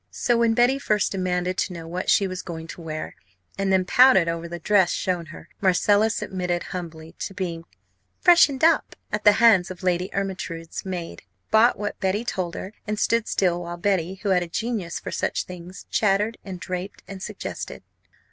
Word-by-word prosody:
So, 240 - 0
when 230 -1 +3
Betty 245 +3 +3
first 210 -6 +1
demanded 185 -1 -1
to 185 - -1
know 165 -1 -8
what 180 +2 -3
she 200 - +4
was 185 -1 -4
going 160 -2 -7
to 170 - -8
wear, 155 -1 -5 0.4
and 195 0 -1
then 190 -1 +3
pouted 250 -6 +6
over 165 0 -2
the 175 +1 -6
dress 190 +1 +3
shown 180 -4 -2
her, 155 - -11
Marcella 205 +3 +3
submitted 185 -5 -2
humbly 165 -3 -7
to 195 - -5
being 170 -4 -4 0.5
"freshened 305 -6 +5
up" 330 0 +3 0.2
at 210 0 -3
the 210 - +8
hands 210 -5 +5
of 185 0 -9
Lady 180 0 +1
Ermyntrude's 185 -4 -4
maid, 175 -3 -5 0.3
bought 220 +3 +5
what 205 0 -4
Betty 200 +4 0
told 180 -7 -3
her, 195 - -6
and 210 0 -2
stood 230 0 +1
still 175 -2 +1
while 175 0 -6
Betty, 185 -1 0
who 205 - 0
had 185 -2 +3
a 175 - -3
genius 200 -2 -3
for - - -6
such - - -1
things, 180 +1 -10
chattered, 210 +2 +1
and 185 -2 -7
draped, 185 +2 -6
and 195 -1 -8
suggested. - - -6
185 Hz, 185 wpm, -24 LUFS, 175-210 Hz, 0.5 s, the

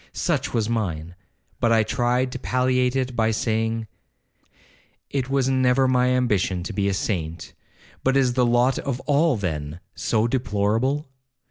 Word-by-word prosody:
Such - - -1
was 110 -3 0
mine, 90 -8 -2 0.5
but 115 - +2
I 110 -1 +4
tried 125 +2 0
to 130 - -5
palliate 125 0 +1
it 130 -1 -1
by 110 -1 +2
saying, 110 0 -1 1.3
'It 135 -2 -2
was 135 -1 +1
never 130 0 +3
my 125 -1 +3
ambition 105 -8 +1
to 85 - -5
be 100 -1 0
a - - 0
saint; 85 -5 -3 0.5
but 135 +1 +3
is 130 -2 +2
the 125 0 +2
lot 120 +2 +2
of 135 -3 -3
all, 145 0 +2
then, 80 -4 -4
so 110 -1 0
deplorable?' 120 +4 0
120 Hz, 150 wpm, -23 LUFS, 105-130 Hz, 1.3 s, I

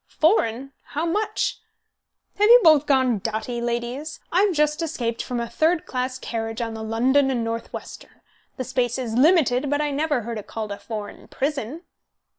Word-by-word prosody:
"Foreign, 275 - +1
how 310 +3 -4
much? 420 +5 -1 0.8
Have 420 - +5
you 480 +2 +9
both 305 -3 +6
gone 260 -5 +3
dotty, 225 +3 -3
ladies? 240 +6 -3
I've 385 +4 +3
just 300 -1 +1
escaped 245 -8 -2
from 245 -1 -3
a 235 - -2
third 315 +8 +1
class 255 0 -3
carriage 225 -2 -4
on 230 -1 -3
the 220 - -6
London 255 +5 +2
and 245 -3 0
Northwestern. 230 0 -7 0.4
The 255 - -2
space 250 -1 -1
is 245 -4 -3
limited, 280 -1 +3
but 290 +1 +1
I 295 -1 0
never 290 -2 0
heard 230 0 -4
it 205 - -11
called 215 -2 -5
a 200 - -5
foreign 210 -2 -7
prison." 280 +2 -3
255 Hz, 170 wpm, -23 LUFS, 230-300 Hz, 0.8 s, you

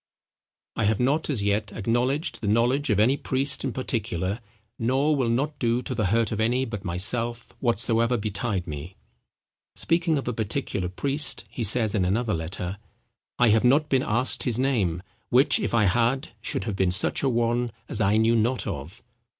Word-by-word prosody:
—"I 110 - +1
have 105 0 +1
not 145 +6 +1
as 125 -9 0
yet 100 +1 0
acknowledged 125 - -1
the 105 - -3
knowledge 120 +7 +2
of 105 - +2
any 125 +6 +4
priest 135 0 -1
in 135 - -1
particular, 110 -5 -2 0.4
nor 135 +6 +2
will 130 -4 0
not 140 +6 -1
do 120 +1 +1
to - - -3
the 110 -4 0
hurt 115 +2 +1
of 110 - -2
any 120 +4 +1
but 105 -5 -6
myself, 115 +7 -1
whatsoever 115 0 +1
betide 105 -3 -2
me." 80 +4 -7 0.8
Speaking 165 -2 +1
of 140 - -4
a 125 - -1
particular 110 -4 -2
priest, 140 +10 -1
he 120 - -4
says 110 0 +3
in 100 - +1
another 105 +4 0
letter; 90 +3 -4 0.6
"I 120 -1 +4
have 110 +1 +3
not 145 +5 +3
been 130 -2 +3
asked 120 +2 0
his 120 -3 +1
name, 105 -10 0 0.3
which 130 +4 +5
if - - -2
I 115 -2 +3
had, 120 +6 +1
should 105 - -2
have 100 0 -3
been 95 -1 +1
such 90 +1 +1
a 135 - +2
one 120 0 0 0.2
as - - -1
I 105 +1 +3
knew 115 +1 +3
not 115 +2 +1
of." 75 +8 -6
115 Hz, 180 wpm, -25 LUFS, 105-130 Hz, 0.8 s, which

